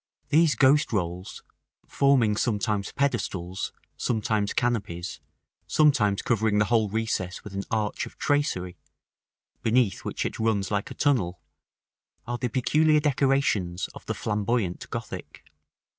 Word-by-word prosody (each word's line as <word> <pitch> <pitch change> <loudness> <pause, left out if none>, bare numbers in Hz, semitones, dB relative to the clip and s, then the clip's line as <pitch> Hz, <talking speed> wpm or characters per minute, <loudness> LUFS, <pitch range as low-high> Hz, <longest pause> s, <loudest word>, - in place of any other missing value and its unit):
These 160 0 +4
ghost 145 +3 +4
rolls, 90 -3 -3 0.4
forming 130 -7 +3
sometimes 105 -2 0
pedestals, 100 -9 -2 0.3
sometimes 110 -3 0
canopies, 100 -8 -2 0.5
sometimes 125 -10 +3
covering 110 -2 +1
the 105 - +4
whole 110 -2 +2
recess 100 -4 -2
with 105 - -9
an 100 0 -3
arch 110 -2 -1
of - - -15
tracery, 95 - 0 0.8
beneath 115 -3 +2
which - - -3
it - - -4
runs 110 -3 0
like 105 -1 -1
a - - -8
tunnel, 95 - +1 0.9
are 120 0 -3
the 125 - -1
peculiar 150 +6 +3
decorations 135 - +1
of - - -11
the - - -2
Flamboyant 105 -3 -1
Gothic. - - -7
110 Hz, 125 wpm, -26 LUFS, 100-130 Hz, 0.9 s, These